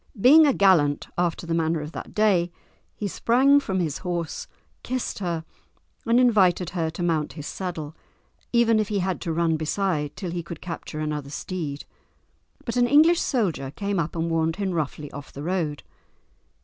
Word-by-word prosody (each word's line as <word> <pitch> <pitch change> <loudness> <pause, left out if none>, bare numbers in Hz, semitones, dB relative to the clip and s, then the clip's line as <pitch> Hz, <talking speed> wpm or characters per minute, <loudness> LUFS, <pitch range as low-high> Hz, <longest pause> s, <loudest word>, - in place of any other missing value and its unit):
Being 300 +8 +7
a 280 - +4
gallant 170 -9 +3
after 175 -1 -1
the 165 - -2
manner 165 0 +1
of 150 +1 -6
that - - -8
day, 190 -5 +3 0.4
he 210 - -3
sprang 265 +8 +4
from 190 -9 -2
his 160 -5 -2
horse, 175 -2 -4 0.3
kissed 255 -4 -3
her, 170 -4 -3 0.6
and 235 +2 +4
invited 190 -8 +3
her 165 -3 -1
to 170 +2 -5
mount 160 -3 0
his 150 -3 -8
saddle 165 -5 -5 0.6
even 230 -2 +4
if 215 - 0
he 205 - -1
had 185 -1 -1
to 170 - -2
run 165 0 +1
beside 155 -2 -1
till 180 -4 -5
he 175 0 -3
could 170 -1 -8
capture 165 -3 -6
another 150 -2 -3
steed. 150 -2 -5 0.8
But 235 0 -3
an 245 0 +4
English 315 +5 +5
soldier 185 - -1
came 200 +5 -2
up 165 0 -2
and 165 0 -1
warned 165 0 0
him 195 -1 -2
roughly 150 -3 -3
off 145 -1 -9
the 140 - -8
road. 165 -4 -2
175 Hz, 175 wpm, -25 LUFS, 160-205 Hz, 0.8 s, Being